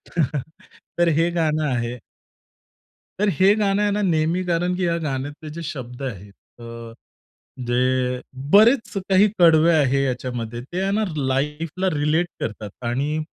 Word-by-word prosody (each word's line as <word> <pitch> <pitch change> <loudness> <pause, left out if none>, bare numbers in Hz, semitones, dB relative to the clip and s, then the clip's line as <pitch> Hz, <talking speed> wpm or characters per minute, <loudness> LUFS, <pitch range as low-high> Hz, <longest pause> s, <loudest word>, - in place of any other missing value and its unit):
तर, 150 -3 0 0.6
तर 175 - +4
हे 165 +1 +2
गाणं 155 -3 0
आहे. 120 -2 -2 1.2
तर 210 +1 +2
हे 195 +2 +6
गाणं 205 -1 +1
आहे 205 - +2
ना 205 +1 0
नेहमी, 165 0 +1
कारण 175 +1 0
की 185 - -1
या 170 0 +1
गाण्यातले 145 +2 -4
जे 170 - -6
शब्द 130 -4 -7
आहेत 105 -6 -6 0.3
अ, 115 -1 -9 0.8
जे 120 0 +1 0.8
बरेच 225 +2 +5 0.2
काही 195 +2 +5
कडवे 165 -1 +6
आहे 140 -2 +2
याच्यामध्ये 120 -3 -3
ते 175 +7 -4
आहे 195 +1 0
ना 215 +2 +1
लाईफला 150 +7 -1
रिलेट 150 +4 +1
करतात 105 -1 -5 0.2
आणि 140 +6 -1
155 Hz, 145 wpm, -22 LUFS, 130-180 Hz, 1.2 s, हे